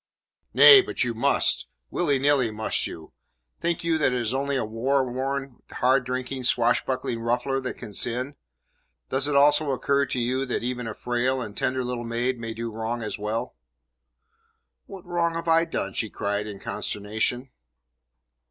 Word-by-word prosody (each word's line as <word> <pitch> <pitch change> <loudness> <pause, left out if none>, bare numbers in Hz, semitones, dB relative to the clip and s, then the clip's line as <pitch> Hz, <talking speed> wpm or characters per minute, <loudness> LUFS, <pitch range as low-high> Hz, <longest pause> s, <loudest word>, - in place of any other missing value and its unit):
"Nay, 410 -3 +10
but - - -2
you 120 -1 -1
must. 115 - +2 0.2
Willy 145 -6 +1
nilly 135 -3 +3
must 110 0 -1
you. 80 -1 -10 0.5
Think 170 0 -1
you 165 -2 0
it 135 -3 +3
is 120 -1 0
only 140 +1 -1
a 130 - 0
war 130 +5 0
worn, 135 +1 -4
hard 130 +1 +2
drinking, 130 +1 -3
swashbuckling 120 0 +1
ruffler 125 +3 -1
that 130 - -5
can 105 - -9
sin? 125 +7 0 0.8
Does 135 +1 +1
it 145 - -1
not 140 0 +6
also 150 0 +3
occur 140 +1 +1
to 130 - -2
you 125 +3 0
that 125 - -2
even 125 -1 -3
a 110 - -5
frail 125 +2 -1
and 105 -4 -6
tender 130 0 -1
little 125 -1 -3
maid 120 +2 -2
may 115 -1 -5
do 115 0 -4
wrong 115 +2 -3
as 105 0 -5
well?" 105 +2 -3 1.3
"What 190 -2 -10
wrong 170 -1 0
have 165 0 -4
I 165 0 +4
done?" 100 - -3
she 110 - -1
cried 100 0 -2
in 100 -2 -8
consternation. 110 +5 -2
125 Hz, 170 wpm, -25 LUFS, 115-140 Hz, 1.3 s, Nay